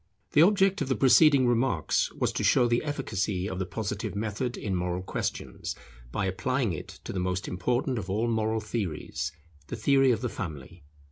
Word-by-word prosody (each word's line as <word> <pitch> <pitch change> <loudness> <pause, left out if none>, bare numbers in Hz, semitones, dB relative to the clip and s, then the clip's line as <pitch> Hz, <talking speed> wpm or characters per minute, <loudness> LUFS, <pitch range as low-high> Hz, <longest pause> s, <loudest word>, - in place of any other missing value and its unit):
The 150 - +5
object 195 0 +4
of 140 - 0
the 130 - +2
preceding 140 0 +6
remarks 120 -9 +1
was - - 0
to - - -3
show 125 - +4
the 120 0 +1
efficacy 105 -10 -2
of 95 -2 -4
the 95 - -2
Positive 105 0 -4
method 110 +4 -2
in 100 - -3
moral 90 0 -2
questions - - -4 0.4
by 100 - -1
applying 120 +3 0
it 75 - -8
to - - -6
the 95 - -2
most 90 +1 -2
important 120 +7 -1
of 95 -2 -7
all 110 +5 0
moral 110 -1 0
theories, 90 -10 -3 0.4
the - - -4
theory 135 +4 +4
of 120 - +2
the 125 - 0
Family. 75 - -7
110 Hz, 185 wpm, -28 LUFS, 95-130 Hz, 0.4 s, preceding